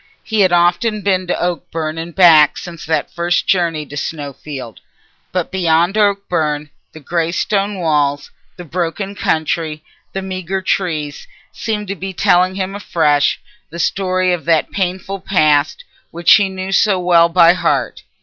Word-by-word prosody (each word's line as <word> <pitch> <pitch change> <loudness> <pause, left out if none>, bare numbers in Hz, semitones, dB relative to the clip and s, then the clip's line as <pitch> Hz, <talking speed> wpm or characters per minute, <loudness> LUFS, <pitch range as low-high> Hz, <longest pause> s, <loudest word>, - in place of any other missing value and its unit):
He 220 -1 -2
had 190 -3 +4
often 175 +5 +2
been 185 -2 0
to - - -1
Oakbourne 165 -2 -3
and 165 0 -7
back 160 -6 +6
since 170 -4 -9
that 160 - -1
first 175 +1 0
journey 170 -5 0
to 145 - -11
Snowfield, 140 -5 -6 0.5
but 180 -2 -2
beyond 175 0 +1
Oakbourne 175 -8 0 0.2
the 155 - -12
greystone 180 +6 -1
walls, 145 -4 0 0.2
the 175 - -9
broken 175 +4 -3
country, 155 -3 -2 0.3
the 195 - -4
meagre 190 0 -4
trees, 155 -7 -2 0.2
seemed 210 -2 -4
to 200 - -3
be 190 +1 -6
telling 180 +1 +2
him 190 0 -3
afresh 155 -7 +1 0.3
the 170 - -9
story 185 +1 0
of 175 - -4
that 165 -2 +1
painful 190 +1 -3
past 155 - +1 0.3
which 170 0 +4
he 205 -3 +4
knew 190 0 -5
so 195 -1 +3
well 170 -2 +4
by 170 0 +6
heart. 185 - -1
175 Hz, 150 wpm, -17 LUFS, 160-190 Hz, 0.5 s, back